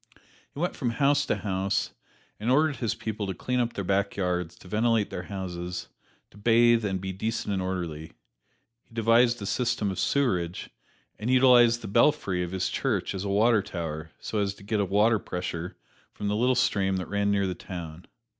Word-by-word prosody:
He - - -10
went 175 +2 -1
from 125 - -1
house 140 +2 +2
to - - +1
house 95 -1 -1 0.5
and 110 +3 -2
ordered 150 +1 +3
his 115 -3 -1
people 110 -2 -4
to 95 - -3
clean 125 +8 -1
up 120 -1 0
their 100 - -3
back 100 +1 0
yards, 90 -3 -1
to - - -16
ventilate 110 +1 +1
their 90 - -5
houses, 90 -2 -5 0.4
to - - -17
bathe 115 +1 +4
and 95 -2 -1
be 95 0 -4
decent 105 +1 -2
and 95 - -1
orderly. 85 -4 -4 0.7
He - - -24
devised 115 +1 +4
a - - -3
system 110 0 0
of 95 - -5
sewerage, 95 -6 0 0.5
and 110 +3 -3
utilized 125 -2 +5
the - - -5
belfry 100 -5 +2
of 90 - -2
his 95 -1 -1
church - - -1
as 95 -1 -4
a - - -2
water 110 +2 +4
tower 80 -4 -5
so 110 - -3
as 100 -1 -1
to 100 - -15
get 105 +1 -1
a 100 - +2
water 105 +3 +3
pressure 90 0 -5 0.3
from 105 - -4
the 105 - 0
little 125 +4 +2
stream 95 -5 +1
that 90 - -3
ran 100 0 0
near 100 -1 +2
the 95 - -1
town. 85 -2 -8
100 Hz, 195 wpm, -27 LUFS, 95-115 Hz, 0.7 s, utilized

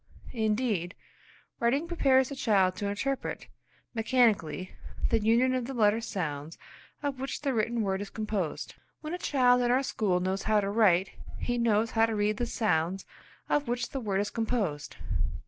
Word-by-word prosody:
Indeed, 215 -5 0 0.6
writing 270 +8 +1
prepares 265 -6 +3
the 280 - -5
child 195 -8 +2
to 205 - -2
interpret 250 +7 -3 0.5
mechanically 220 -8 +1 0.4
the 230 - +4
union 235 +4 +3
of 255 -2 -1
the 270 - -5
letter 215 0 +3
sounds 160 -8 -4 0.5
of 280 -2 -2
which 270 0 -4
the 275 -2 +1
written 230 0 0
word 190 -1 -1
is 205 - -6
composed. 210 -7 -3 0.3
When 310 +2 -5
a 360 - -3
child 250 -6 +3
in 240 - +1
our 255 +2 +3
school 200 -8 0
knows 190 +2 -1
how 215 -1 +2
to 200 -1 -1
write, 195 -4 +3 0.3
he 245 0 -2
knows 225 -1 +2
how 225 0 +3
to 225 - -2
read 210 0 +1
the 240 - -1
sounds 185 -4 0 0.4
of 290 -2 +1
which 240 0 -1
the 270 - -3
word 200 -5 0
is 205 - -3
composed. 215 -11 -2
225 Hz, 170 wpm, -29 LUFS, 195-250 Hz, 0.6 s, the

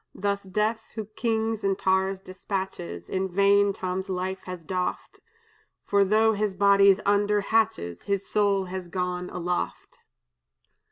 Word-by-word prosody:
Thus 200 0 -1
death, 210 +4 -2
who 220 -2 -4
kings 220 0 -2
and 195 -1 +1
tars 190 0 +1
dispatches, 185 - -5
In 190 0 -2
vain 200 +2 +4
Tom's 185 0 -4
life 190 +1 -3
has 180 -2 -7
doffed; 180 +2 -3 0.7
For 200 0 +3
though 220 +3 +3
his 205 -2 -1
body's 200 0 +5
under 205 0 +2
hatches, 195 - 0
His 200 -1 -2
soul 200 -2 +1
is 185 0 -6
gone 180 0 -3
aloft!" 180 0 -4
195 Hz, 130 wpm, -26 LUFS, 185-205 Hz, 0.7 s, body's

